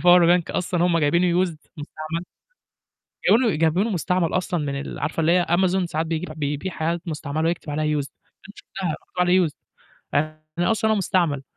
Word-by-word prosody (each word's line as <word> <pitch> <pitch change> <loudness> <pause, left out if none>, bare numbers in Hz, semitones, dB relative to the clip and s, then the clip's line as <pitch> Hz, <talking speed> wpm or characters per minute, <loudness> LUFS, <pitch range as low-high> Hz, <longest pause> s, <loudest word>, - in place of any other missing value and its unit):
الpower 175 0 +7 0.2
bank - - -9
أصلًا 180 -1 0
هُم 170 -2 +2
جايبينه 170 +4 +3
used 170 -4 -5 0.2
مستعمل، 155 +3 -5 1.1
جايبينه 230 -4 +4
جايبينه 165 +8 +2
مستعمل 180 -2 0
أصلًا 180 -2 0
من 140 -2 -2
ال 140 - -6
عارفة 150 +3 -3
اللي 165 +2 +3
هي 180 -1 +3
Amazon 185 +1 +2
ساعات 160 -1 -2
بيج 160 +1 -2
بيبيع 150 +4 -3
حاجات 165 +1 -2
مستعملة، 155 0 -2
ويكتب 170 -2 -3
عليها 150 0 0
used 140 - -6
دي - - -26 0.3
أنا 205 - -12
شُفتها 190 -2 -6
مكتوب 165 - -9
عليه 180 0 +4
used 150 - -9 0.6
يعني 155 +5 -1
أصلًا 220 0 +1
هو - - +3
مستعمل. 170 -8 +1
170 Hz, 180 wpm, -23 LUFS, 155-180 Hz, 1.1 s, الpower